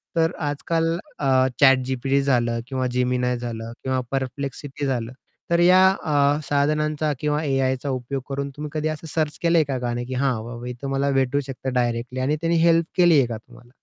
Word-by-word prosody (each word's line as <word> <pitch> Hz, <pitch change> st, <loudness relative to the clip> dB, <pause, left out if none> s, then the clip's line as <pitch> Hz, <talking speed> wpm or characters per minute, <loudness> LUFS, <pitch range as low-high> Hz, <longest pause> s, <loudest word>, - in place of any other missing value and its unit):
तर 165 Hz, 0 st, +3 dB, 0.2 s
आज-काल 165 Hz, +3 st, -1 dB, 0.2 s
अ, 130 Hz, -2 st, +3 dB
ChatGPT 135 Hz, 0 st, +3 dB
झालं 120 Hz, -4 st, +1 dB
किंवा 130 Hz, -1 st, -2 dB
Gemini 125 Hz, 0 st, +1 dB
झालं 115 Hz, -2 st, -5 dB
किंवा 130 Hz, -1 st, 0 dB, 0.2 s
Perplexity 135 Hz, +2 st, -4 dB
झालं, 120 Hz, -4 st, -2 dB, 0.4 s
तर 170 Hz, -, +4 dB
या 185 Hz, +2 st, +6 dB
अ, 145 Hz, -5 st, +1 dB
साधनांचा 150 Hz, +1 st, +1 dB
किंवा 150 Hz, +1 st, 0 dB
एआयचा 135 Hz, -1 st, 0 dB
उपयोग 130 Hz, +1 st, -3 dB
करून 140 Hz, 0 st, -3 dB
तुम्ही 150 Hz, 0 st, -5 dB
कधी 155 Hz, 0 st, -1 dB
असं 155 Hz, +1 st, -4 dB
सर्च 155 Hz, -2 st, -1 dB
केलंय 170 Hz, -1 st, +4 dB
का 130 Hz, -, -1 dB
नाही, 120 Hz, 0 st, -3 dB
की 130 Hz, -, -6 dB
"हां, 130 Hz, +1 st, +1 dB
बाबा 120 Hz, +1 st, -7 dB
इथे 125 Hz, +3 st, -6 dB
मला 135 Hz, +1 st, 0 dB
भेटू 135 Hz, +1 st, +1 dB
शकत 135 Hz, 0 st, -7 dB
डायरेक्टली," 120 Hz, 0 st, -1 dB
आणि 135 Hz, +4 st, +1 dB
त्यांनी 170 Hz, 0 st, +1 dB
हेल्प 165 Hz, 0 st, +4 dB
केली 175 Hz, -3 st, +6 dB
आहे 135 Hz, -3 st, +4 dB
का 115 Hz, -2 st, -4 dB
तुम्हाला? 120 Hz, +2 st, -18 dB
135 Hz, 180 wpm, -23 LUFS, 125-150 Hz, 0.4 s, या